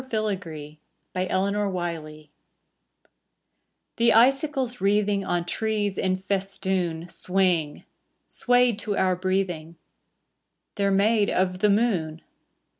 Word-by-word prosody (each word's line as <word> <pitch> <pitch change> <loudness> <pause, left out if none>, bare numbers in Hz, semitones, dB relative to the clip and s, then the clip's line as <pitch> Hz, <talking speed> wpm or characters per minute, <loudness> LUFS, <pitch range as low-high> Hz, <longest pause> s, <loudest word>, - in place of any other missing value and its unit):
SILVBR 190 - -4 0.4
FILAGREE 180 -5 -2 1.7
The 230 0 +4
icicles 260 +1 +2
wreathing 200 0 +2
On 175 -2 -1
trees 210 +1 -1
in 185 -1 0
festoon 190 -3 -2
Swing, 180 -4 0 0.4
swayed 245 -3 +2
to 205 -1 -3
our 185 -1 +2
breathing: 180 -3 -2 1.0
They're 200 -1 0
made 205 +2 +3
of 185 0 0
the 210 +1 +3
moon. 190 -8 0
195 Hz, 90 wpm, -25 LUFS, 175-210 Hz, 1.7 s, The